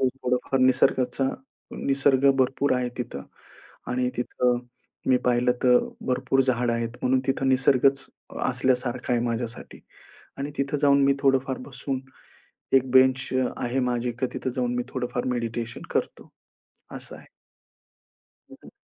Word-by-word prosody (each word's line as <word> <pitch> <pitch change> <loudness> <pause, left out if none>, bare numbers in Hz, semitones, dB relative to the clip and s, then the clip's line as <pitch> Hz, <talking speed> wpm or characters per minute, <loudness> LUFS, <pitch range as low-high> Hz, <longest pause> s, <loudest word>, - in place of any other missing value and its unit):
थोडंफार 130 0 0
निसर्गाचा 130 0 +2 0.6
निसर्ग 135 0 +4
भरपूर 135 +2 +2
आहे 125 -1 -1
तिथं. 125 - -5 0.7
आणि 125 0 0
तिथं 125 0 +1 0.5
मी 130 - +5
पाहिलं 125 0 +3
तर 125 -1 +6 0.3
भरपूर 130 +1 +1
झाडं 125 -2 +1
आहेत. 115 0 -1
म्हणून 130 +1 +2
तिथं 135 0 0
निसर्गच 135 +1 +3 0.4
असल्यासारखं 125 -1 0
आहे 120 - +2
माझ्यासाठी. 115 0 -4 0.6
आणि 140 +2 -3
तिथं 140 +1 0
जाऊन 140 -1 +5
मी 140 0 +4
थोडंफार 135 -1 +1
बसून 135 0 -4 0.8
एक 130 -1 +1
बेंच 130 0 +4
अ, 130 -1 +2 0.2
आहे 125 +2 0
माझी 120 0 -1
की 130 - +2
तिथं 130 - -3
जाऊन 125 -1 0
मी 125 - 0
थोडंफार 125 -1 -3
मेडिटेशन 115 0 -4
करतो. - - -3 0.6
असं - - -7
आहे. - - -16 1.2
हं, - - -11
हं. - - -13
130 Hz, 135 wpm, -25 LUFS, 125-135 Hz, 1.2 s, तर